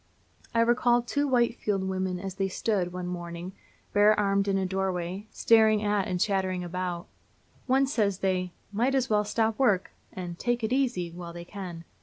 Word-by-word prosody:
I 230 - +5
recall 240 +1 +3
two 285 +4 0
Whitefield 235 -6 +1
women 185 -1 -2
as 190 0 -5
they 195 0 -1
stood, 190 -2 -1
one 180 0 -5
morning, 175 0 -6 0.4
bare 210 +1 +5
armed 200 -1 +2
in 195 -1 +2
a 190 - 0
doorway, 190 +1 -2
staring 220 -2 +4
at 205 -2 +1
and 180 -1 -2
chattering 185 -2 0
about 175 0 -3
it. - - -20 0.7
One 270 +1 +5
says 210 -8 0
they 185 -2 0 0.2
"might 240 +6 +1
as 260 -3 0
well 210 0 +4
stop 220 +2 0
work" 205 -9 +2 0.2
and 175 -2 -6
"take 240 -1 0
it 220 +3 0
easy" 240 -11 0
while 170 0 -8
they 170 0 -8
can. 180 -4 -7
195 Hz, 180 wpm, -28 LUFS, 180-225 Hz, 0.7 s, I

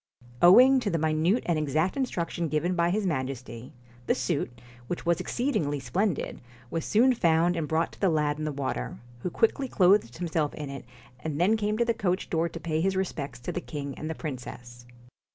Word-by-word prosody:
Owing 255 +10 +8
to 230 - -1
the 170 - 0
minute 160 +8 +1
and 170 -3 +1
exact 155 +5 0
instructions 175 - -2
given 155 +4 0
by 170 0 +2
his 205 +3 0
Majesty, 130 -6 -4 0.4
the - - +3
suit, 120 -1 -2 0.3
which 175 - -4
was 170 0 +2
exceed 250 +9 -1
ingly 145 -2 0
splendid, 175 - -1 0.3
was 165 -1 -2
soon 250 +5 +4
found 170 -4 +3
and 165 -3 -2
brought 160 +2 0
to - - -16
the 195 - +3
lad 150 -2 +1
in - - -3
the 155 - -1
water, 130 - -3 0.2
who 180 - -3
quickly 230 +8 +1
clothed 190 - +3
himself 160 -3 -1
in 145 -3 -6
it 135 -2 -8 0.3
and 150 +2 -4
then 195 +6 +4
came 210 0 -1
to 235 - +2
the 230 - +2
coach 185 -4 -1
door 165 0 +1
to 165 - -8
pay 160 0 -1
his 190 +2 +1
respects 145 -9 -3
to - - -4
the 180 - -3
king 140 -5 -6
and 155 - -5
the 160 - -3
princess. 125 -4 -8
165 Hz, 205 wpm, -27 LUFS, 145-190 Hz, 0.4 s, Owing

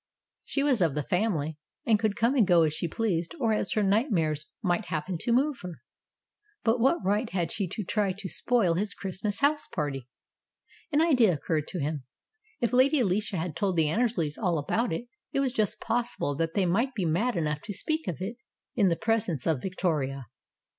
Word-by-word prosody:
She 280 - 0
was 265 -7 +2
of 160 -5 +2
the 150 - -1
family, 160 -5 -1 0.3
and 220 -2 +4
could 215 -2 0
come 235 +2 +2
and 235 -8 +4
go 175 -3 +6
as 155 -2 +1
she 170 - -1
pleased 175 -3 -1
or 225 -4 +2
as 210 - 0
her 215 - +2
nightmares 190 - +1 0.2
might 180 +2 +1
happen 175 +2 -3
to 235 - -1
move 270 +3 +2
her; 180 -3 -8 0.8
but 230 +2 +2
what 265 - +2
right 210 +4 +1
had 175 -3 -1
she 200 -3 -1
to 210 +5 -4
try 205 +1 0
to 195 +1 -6
spoil 215 -2 +2
his 200 +4 -2
Christmas 200 +2 -3
house 295 +1 +2
party? 140 -6 -3 0.8
An 295 +1 +3
idea 255 - +5
occurred 155 -1 -1
to 180 - -4
him. 150 0 -2 0.6
If 235 0 0
Lady 270 +4 +5
Alicia 205 -2 0
had 160 -1 -3
told 190 +1 0
the 160 -3 +3
Annersleys 195 -8 0
all 180 -6 +1
about 220 +11 0
it, 165 +9 -3 0.3
it - - +1
was 270 -2 +1
just 215 -5 0
possible 230 -10 -1
that 165 +3 -2
they 195 - +3
might 230 +9 +1
be 195 -5 -1
mad 200 +10 +1
enough 150 -3 -1
to 210 - -5
speak 315 - -2
of 170 - -2
it 215 +6 -4 0.4
in 200 -5 +3
the 170 - +2
pres 225 +1 0
ence 150 -7 -3
of 155 -6 +1
Victoria. 150 -8 -1
195 Hz, 200 wpm, -28 LUFS, 165-230 Hz, 0.8 s, go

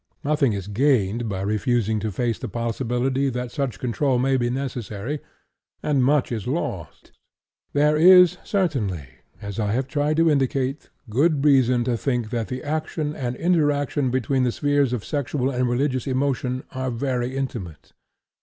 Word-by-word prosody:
Nothing 145 -5 +2
is 100 -2 -4
gained 115 -1 +1
by 95 -2 -3
refusing 110 +1 0
to 110 +1 -3
face 115 +3 -1
the - - -5
possibility 125 +3 -1
that 125 -1 -4
such 135 - -2
control 125 +4 0
may 135 +2 +2
be 120 -2 +1
necessary, 125 0 -4 0.6
and 140 -4 +2
much 140 0 +2
is 115 -1 -3
lost. 100 - -4 0.6
There 150 +1 +3
is 180 +2 +7
certainly, 120 - -1 0.4
as 100 +1 -5
I 105 -2 0
have 130 +2 -1
tried 145 +3 0
to 165 0 +4
indicate, 135 0 -1 0.2
good 140 +6 +2
reason 130 -4 +4
to 120 -1 0
think 120 -3 -2
that 115 -4 -2
the 125 +7 -5
action 155 0 -2
and 125 -3 -3
interaction 145 -5 +1
between 130 +1 0
the 125 - +2
spheres 145 -1 +1
of 120 -5 -3
sexual 140 -2 -1
and 125 -1 0
religious 130 0 0
emotion 130 -1 -1
are 130 0 -3
very 125 +1 -2
intimate. 110 - -6
130 Hz, 155 wpm, -23 LUFS, 120-145 Hz, 0.6 s, is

